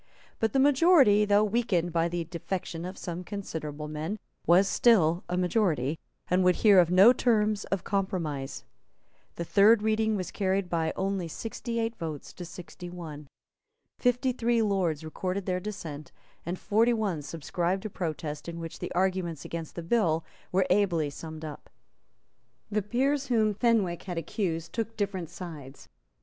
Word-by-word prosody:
But 225 -2 0
the 270 - +3
majority, 275 - +5
though 205 0 +4
weakened 205 -6 0
by 165 0 +2
the 175 0 -2
defection 170 0 -5
of 185 +1 -7
some 175 0 -5
considerable 160 -7 -5
men, 155 +7 -4 0.3
was 180 +3 +6
still 180 -8 +4
a 180 - -1
majority, 175 - +1 0.3
and 185 +1 +2
would 180 -1 +4
hear 200 -3 +8
of 175 -2 +4
no 190 +7 +7
terms 215 -4 +1
of 195 -2 -2
compromise. 170 -9 -2 0.7
The 170 - -4
third 205 +4 +5
reading 220 0 +2
was 185 -3 -3
carried 190 -2 -1
by 165 -2 +1
only 190 -2 -1
sixty 230 +6 -4
eight 225 0 -1
votes 155 -4 -6
to 180 - -8
sixty 175 +1 -9
one. 155 -5 -8 0.7
Fifty 245 +1 +2
three 235 -1 +1
Lords 185 -7 0
recorded 185 +4 -3
their 180 -1 0
dissent; 165 -7 -7 0.4
and 175 +2 -2
forty 225 +6 +2
one 200 -9 -1
subscribed 175 +5 -2
a - - -2
protest, 155 -3 -4
in 170 0 -6
which 165 -1 -7
the - - -5
arguments 180 -4 -1
against 165 -2 -6
the 170 - -5
bill 165 -5 +1 0.3
were 190 0 +3
ably 175 -7 +2
summed 160 +1 -8
up. 150 - -9 1.0
The 210 +1 +1
peers 270 +7 0
whom 220 -4 +2
Fenwick 205 -6 +1
had 180 -3 -6
accused 165 -1 -3
took 225 -1 -3
different 190 -5 -2
sides. 155 -6 -9
185 Hz, 160 wpm, -28 LUFS, 165-215 Hz, 1.0 s, hear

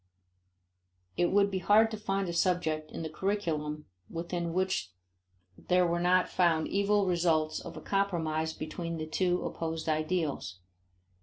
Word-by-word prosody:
It 175 - +2
would 200 +1 +3
be 190 - -1
hard 215 +4 +5
to - - -3
find 195 -2 -1
a 170 - -3
subject 160 -3 0
in - - -5
the - - -2
curriculum 155 -4 -2 0.2
within 170 0 -3
which 185 - 0 0.7
there 180 - +2
are 170 - 0
not 180 +1 +3
found 165 -3 +2
evil 200 +1 +2
results 165 -3 +1
of 170 - -9
a - - -7
compromise 160 -5 0
between 165 +2 -5
the 155 - -3
two 180 +3 0
opposed 165 -1 -4
ideals. 155 - -1
175 Hz, 145 wpm, -30 LUFS, 160-190 Hz, 0.7 s, hard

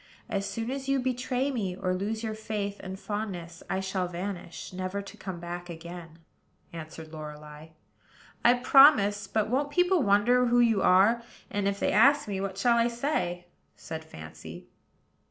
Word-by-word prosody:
As 200 -1 -2
soon 230 +1 -3
as 270 0 -4
you 275 - +3
betray 255 +1 -1
me, 200 -8 -2
or 185 0 -1
lose 210 +4 -3
your 220 -1 -2
faith 210 -2 -4
and 190 0 -7
fondness, 185 -6 -5
I 190 - -1
shall 190 -1 -2
vanish, 180 0 -6
never 185 +2 -3
to 200 - -9
come 185 -3 -7
back 175 +1 -6
again," 170 0 -9 0.6
answered 160 -1 -9
Lorelei. 150 0 -9 0.8
"I 240 +1 +6
promise: 245 -6 +6
but 215 -2 0
won't 280 +3 +1
people 355 +2 +3
wonder 245 +4 +4
who 240 +1 +3
you 225 -4 +4
are? 200 +7 +5 0.3
and, 200 -1 0
if 200 0 -1
they - - +1
ask 275 +5 +5
me, 195 -2 -3
what 195 -1 -4
shall 235 +3 +3
I 230 - +3
say?" 235 - -2 0.3
said 160 0 -7
Fancy. 80 - -11
200 Hz, 165 wpm, -28 LUFS, 175-235 Hz, 0.8 s, I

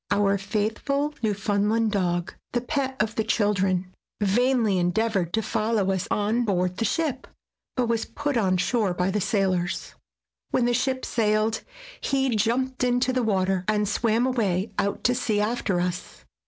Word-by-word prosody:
Our 200 -1 +2
faithful 225 +9 -1
Newfoundland 210 +1 +1
dog, 175 -3 -1 0.2
the 240 - +1
pet 265 0 -2
of 215 +1 0
the 220 - 0
children, 195 -4 +1 0.3
vainly 220 -1 +2
endeavored 180 0 0
to 220 - +1
follow 215 -3 0
us 190 -2 -2
on 215 +4 +1
board 185 -4 0
the 225 - 0
ship, 270 +4 -1 0.5
but 250 - +1
was 230 -1 0
put 290 -1 -3
on 190 -5 +2
shore 200 0 +1
by 180 +2 0
the 210 +1 0
sailors. 185 -3 0 0.6
When 245 - +2
the 240 - +2
ship 260 +2 0
sailed 215 0 +1 0.4
he 270 -3 +1
jumped 250 +4 0
into 250 +1 +2
the 255 - +1
water 190 -4 +1
and 210 -1 +1
swam 225 +3 +1
away 210 -6 0
out 200 - -1
to 245 - +3
sea 225 -4 0
after 210 -4 0
us. 180 0 -4
215 Hz, 155 wpm, -25 LUFS, 195-245 Hz, 0.6 s, to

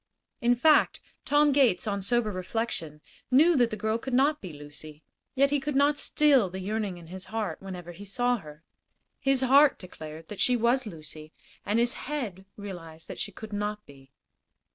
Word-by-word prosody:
In 240 +1 +4
fact, 305 +5 +4 0.3
Tom 290 +1 +4
Gates, 260 -10 +3
on 200 -2 -2
sober 220 +2 +1
reflection, 185 -5 -4 0.3
knew 310 +7 +5
that 240 -4 +3
the 215 - -5
girl 220 +2 -1
could 260 +1 -3
not 290 +4 +3
be 185 - -7
Lucy, 150 +1 -11 0.3
yet 275 +1 +3
he 290 - +2
could 280 +1 -3
not 285 +1 +3
still 275 -9 +3
the 190 +2 -6
yearning 205 -1 -3
in 170 - -12
his 185 +3 -7
heart 215 -7 -3
whenever 180 -3 -7
he 180 +4 -11
saw 245 +4 +1
her. 150 -4 -13 0.6
His 270 -2 +2
heart 275 +2 +5
declared 160 -3 -10
that 210 - -8
she 250 -1 +3
was 240 +2 +1
Lucy, 155 -3 -9 0.3
and 210 +2 +1
his 240 +2 +3 0.2
head 215 -11 -4
realized 170 -6 -9
that - - -7
she 205 - -3
could 215 +2 -10
not 210 +1 -3
be. 135 -1 -17
210 Hz, 185 wpm, -28 LUFS, 175-260 Hz, 0.6 s, knew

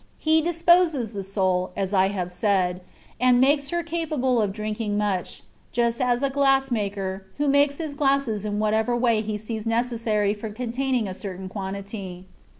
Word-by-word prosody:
He 315 0 +3
disposes 335 - +3
the 200 - -4
soul 185 -2 0
(as 195 0 -2
I 190 -1 +2
said), 180 -1 0 0.4
and 250 -1 +4
makes 280 +2 +3
her 345 +1 -1
capable 305 -8 0
of 205 -2 0
drinking 210 0 -3
much, 200 -4 -2 0.3
just 235 +1 0
as 245 +1 +1
a 275 - +2
glass 270 -1 +2
maker, 195 -3 -3
who 290 0 0
makes 285 0 +3
his 315 -3 -4
glasses 275 -7 +1
in 210 -1 -2
whatever 220 +3 +1
way 235 -3 +2
he 215 -1 -3
sees 220 +1 -5
necessary 225 -3 0
for 215 +1 -6
containing 245 +1 -1
a 185 - -4
certain 190 -1 -6
quantity. 195 -1 -6
220 Hz, 160 wpm, -24 LUFS, 200-270 Hz, 0.4 s, and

